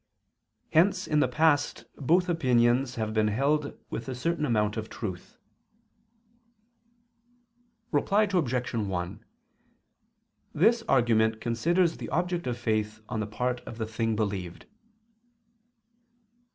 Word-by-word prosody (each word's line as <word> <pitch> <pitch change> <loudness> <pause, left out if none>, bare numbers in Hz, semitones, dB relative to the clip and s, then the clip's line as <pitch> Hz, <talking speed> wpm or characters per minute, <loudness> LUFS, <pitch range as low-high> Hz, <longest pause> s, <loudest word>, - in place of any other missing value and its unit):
Hence 185 +4 +3
in 150 - +1
the - - +3
past 150 -2 +1
both 175 +6 +2
opinions 125 -5 +2
have 110 -1 -2
been 110 -1 +2
held 140 +7 0
with - - -5
a 130 - -3
certain 160 +4 -1
amount 105 -3 +1
of 110 -1 -5
truth. 95 -6 -7 2.5
Reply 195 +8 +3
Obj. 140 - 0
1: 100 -1 -3 1.3
This 225 +9 +4
argument 110 -3 +3
considers 165 +10 +1
the - - -6
object 175 -2 -1
of 120 -1 -2
faith 110 -2 -1
on 110 - -2
the 105 - -2
part 125 +3 -2
of 115 - -7
the 110 - -2
thing 110 0 -1
believed. 100 -5 -3
120 Hz, 115 wpm, -28 LUFS, 110-155 Hz, 2.5 s, This